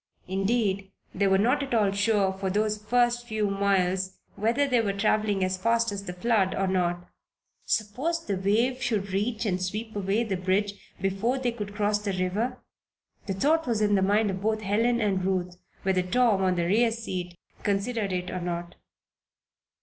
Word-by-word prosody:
Indeed, 195 0 0 0.2
they 200 +1 +1
were 190 0 +4
not 250 +8 +2
at 270 -3 -2
all 210 -3 +3
sure 200 -1 +2
for 190 0 -3
those 210 +2 0
first 240 +1 +1
few 215 -3 -1
miles 190 -1 +1 0.2
whether 230 +8 +1
they 250 -3 +3
were 200 -3 -1
traveling 205 -1 +1
as 185 0 0
fast 230 +2 +1
as 200 0 -5
the 180 - -5
flood, 195 0 +1
or 195 - 0
not. 175 -2 0 0.6
Suppose 275 +11 -1
the 200 - -1
wave 225 +7 +1
should 210 -6 -1
reach 220 +3 -1
and 185 -3 0
sweep 215 +4 -4
away 200 +3 0
the 200 -5 -2
bridge 195 +2 -1
before 195 +7 0
they 250 -2 0
could 210 -3 -6
cross 205 0 +1
the 205 -2 -3
river? 200 +7 -1 0.7
The 195 - -1
thought 310 +8 +2
was 230 -3 +1
in 210 -1 +2
the 195 - +3
mind 205 +2 +2
of 190 0 -5
both 215 +1 0
Helen 230 +4 +2
and 195 -4 0
Ruth, 180 -1 -1 0.3
whether 190 -1 +2
Tom, 215 +2 +2
on 185 -1 +2
the 170 -1 0
rear 225 +6 +3
seat, 185 -6 -5 0.2
considered 205 +1 -1
it 180 0 -2
or 185 - -3
not. 175 0 -4
205 Hz, 180 wpm, -27 LUFS, 190-230 Hz, 0.7 s, were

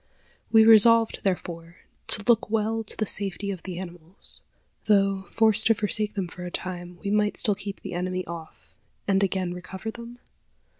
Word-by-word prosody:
We 220 -1 +6
resolved, 225 +1 +6
therefore, 170 -3 -3 0.3
to 205 - +3
look 230 -2 +3
well 225 +1 -1
to 210 - -3
the 215 - 0
safety 200 0 -2
of 185 -3 -7
the 185 -2 -7
animals. 175 0 -7 0.4
Though, 195 -2 +2
forced 220 -1 +4
to 225 - +4
forsake 210 -1 0
them 195 -3 -2
for 180 +1 -10
a 180 - -5
time, 175 -1 -6
we 200 - -2
might 210 0 +1
still 210 - +3
keep 200 0 -7
the - - -7
enemy 185 +1 -3
off, 160 - -10 0.3
and 195 -1 +2
again 185 -2 -1
recover 190 +4 -7
them? 235 +1 -10
195 Hz, 170 wpm, -25 LUFS, 180-215 Hz, 0.4 s, We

